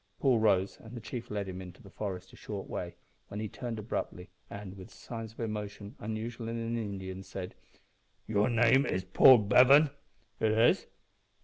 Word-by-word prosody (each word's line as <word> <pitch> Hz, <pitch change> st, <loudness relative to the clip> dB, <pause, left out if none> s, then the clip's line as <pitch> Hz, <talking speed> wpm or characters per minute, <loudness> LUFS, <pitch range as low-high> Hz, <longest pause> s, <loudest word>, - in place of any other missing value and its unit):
Paul 130 Hz, -4 st, +3 dB
rose, 100 Hz, -3 st, +2 dB
and 115 Hz, +2 st, -10 dB
the -, -, -4 dB
chief 115 Hz, +1 st, -7 dB
led 105 Hz, -2 st, -3 dB
him 95 Hz, 0 st, -6 dB
into 90 Hz, -1 st, -11 dB
the 100 Hz, -, -14 dB
forest 95 Hz, -3 st, -5 dB
a -, -, -11 dB
short 100 Hz, -2 st, -6 dB
way, 85 Hz, 0 st, -5 dB, 0.3 s
when 105 Hz, -, -6 dB
he 110 Hz, -, -2 dB
turned 115 Hz, +2 st, -5 dB
abruptly, 100 Hz, -3 st, -4 dB, 0.2 s
and, 100 Hz, -2 st, -8 dB
with 95 Hz, -1 st, -11 dB
signs 115 Hz, -2 st, -7 dB
of -, -, -20 dB
emotion 105 Hz, -2 st, -5 dB
unusual 115 Hz, +2 st, -5 dB
in 115 Hz, -, -3 dB
an 115 Hz, 0 st, -2 dB
Indian, 95 Hz, -4 st, -5 dB
said 95 Hz, -1 st, -7 dB, 0.7 s
"Your 105 Hz, +1 st, +2 dB
name 120 Hz, +3 st, +4 dB
is 95 Hz, -, -1 dB
Paul 125 Hz, +7 st, +8 dB
Bevan?" 130 Hz, +7 st, +6 dB, 0.5 s
"It 110 Hz, -1 st, +2 dB
is." 115 Hz, +2 st, +3 dB
105 Hz, 180 wpm, -31 LUFS, 95-115 Hz, 0.7 s, Paul